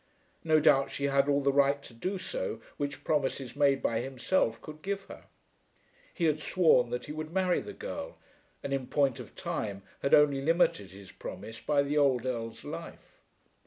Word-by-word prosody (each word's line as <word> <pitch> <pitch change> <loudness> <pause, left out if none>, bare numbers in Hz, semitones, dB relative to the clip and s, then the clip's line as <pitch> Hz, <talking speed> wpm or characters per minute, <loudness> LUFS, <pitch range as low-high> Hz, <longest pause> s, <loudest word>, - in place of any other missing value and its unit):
No 155 -2 +4
doubt 135 -2 +4
she 140 - -5
had 140 0 +2
all 140 0 +3
the 140 0 +2
right 140 0 +4
to 120 - -12
do 185 +13 -3
so - - -4 0.2
which 145 -1 -4
promises 135 -4 -1
made 140 -2 +3
by 115 -1 +1
himself 125 -1 0
could 155 0 -10
give 200 +2 -3
her. - - -12 0.9
He 170 - -1
had 155 -1 +2
sworn 155 -7 +3
that 125 0 -3
he - - -7
would 155 +1 -5
marry 185 0 +1
the - - -8
girl, - - -6 0.5
and 140 - -3
in 135 -2 -2
point 140 -4 +1
of - - -10
time 100 -2 -4 0.2
had 140 - +5
only 145 -2 +4
limited 150 - +2
his 95 0 -12
promise 115 +1 -8
by 145 -1 +2
the 145 +1 +1
old 130 -4 +3
Earl's 115 -3 -4
life. - - -9
140 Hz, 185 wpm, -30 LUFS, 130-155 Hz, 0.9 s, had